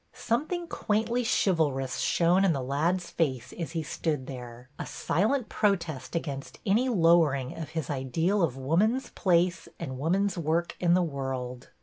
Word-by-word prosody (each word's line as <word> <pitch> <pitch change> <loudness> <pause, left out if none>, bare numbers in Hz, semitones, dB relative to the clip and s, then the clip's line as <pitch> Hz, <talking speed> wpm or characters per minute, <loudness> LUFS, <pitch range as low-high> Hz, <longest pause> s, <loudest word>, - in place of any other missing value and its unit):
Something 325 +9 -1
quaintly 230 -1 0
chivalrous 155 - +1
shone 175 +3 +3
in 190 -4 +4
the 135 -3 -2
lad's 165 +7 0
face 130 -6 -1
as 165 -2 -5
he 165 -2 -1
stood 150 -3 -2
there, 125 -2 -9
a - - -3
silent 220 - 0
protest 170 -10 -1
against 140 -5 -4
any 225 +6 +3
lowering 165 - +3
of 160 -2 -6
his 160 - -1
ideal 160 +9 0
of 145 -7 +1
woman's 195 - +1
place 175 -1 +1
and 130 -6 -5
woman's 185 +5 +1
work 165 +2 0
in 175 -1 +4
the 180 - +3
world. 130 -4 -4
165 Hz, 150 wpm, -28 LUFS, 135-190 Hz, -, in